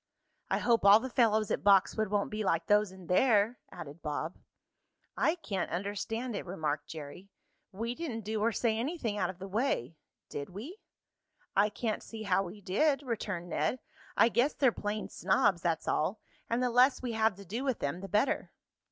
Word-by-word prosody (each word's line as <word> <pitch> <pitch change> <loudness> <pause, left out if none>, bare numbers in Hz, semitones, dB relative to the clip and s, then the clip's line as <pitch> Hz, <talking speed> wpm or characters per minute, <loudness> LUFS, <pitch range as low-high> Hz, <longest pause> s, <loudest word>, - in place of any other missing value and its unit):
"I - - +2
hope 235 -1 +2
all 200 +2 +8
the 260 +2 -6
fellows 220 -4 +3
at - - -1
Boxwood 200 +2 +4
won't 205 0 -1
be 215 0 -2
like 165 -4 +1
those 210 0 +3
in 190 -1 -12
there," 215 +4 +3
added 160 -2 -9
Bob. 155 +2 -3 0.8
"I 320 - +2
can't 200 - -3
understand 205 +6 -3
it," - - -3
remarked 155 -5 -3
Jerry. 160 +5 -9 0.4
"We 230 +5 -3
didn't 250 -6 -4
do 215 0 -3
or 230 +2 +3
say 225 -1 0
anything 240 -6 -2
out - - +1
of 185 - -7
the 195 +1 -7
way; 195 - -1 0.3
did 140 - -6
we?" 250 - -8 0.8
"I 205 +2 +4
can't 220 0 -2
see 220 -1 -8
how 195 -2 +2
we 195 +2 -7
did," 275 +10 +1
returned 205 -8 -3
Ned. 155 - 0 0.4
"I 230 - +6
guess 245 +6 +2
they're 265 -4 +4
plain 210 0 -3
snobs, 190 -1 +2
that's 165 -2 -1
all, 185 +8 0 0.3
and 235 +2 +1
the 250 - +1
less 255 +3 +4
we 245 - -2
have 220 -2 +2
to 200 +1 -12
do 225 +9 -4
with 265 -4 0
them 145 +6 -3
the 195 - -7
better." 210 +8 +1
210 Hz, 185 wpm, -31 LUFS, 185-235 Hz, 0.8 s, all